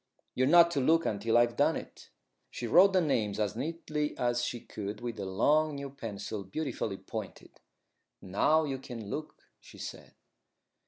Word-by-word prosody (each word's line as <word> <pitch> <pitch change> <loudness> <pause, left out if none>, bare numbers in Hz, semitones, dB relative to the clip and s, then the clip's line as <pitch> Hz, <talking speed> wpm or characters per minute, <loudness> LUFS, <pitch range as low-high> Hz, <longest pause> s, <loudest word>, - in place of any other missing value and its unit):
You're 130 +1 +2
not 170 +2 +7
to 145 - 0
look 165 +5 +3
until 110 +3 +1
I've 120 0 +3
done - - +3
it." - - -9 0.4
She 120 - -6
wrote 185 - +6
the 185 - +4
name 110 - 0
as 105 -2 -1
neatly 150 +2 -3
as 120 -1 0
she 120 - -2
could 105 -1 -6
with 120 -3 -5
a 100 - -3
long 150 +10 +2
new 140 -1 -6
pencil, 110 -5 -6
beautifully 105 -2 -3
pointed. - - -8 0.6
"Now 150 +12 +2
you 135 -3 -3
can 115 -5 -8
look," 155 0 -5 0.2
she - - -15
said. - - -9
120 Hz, 165 wpm, -30 LUFS, 110-155 Hz, 0.6 s, not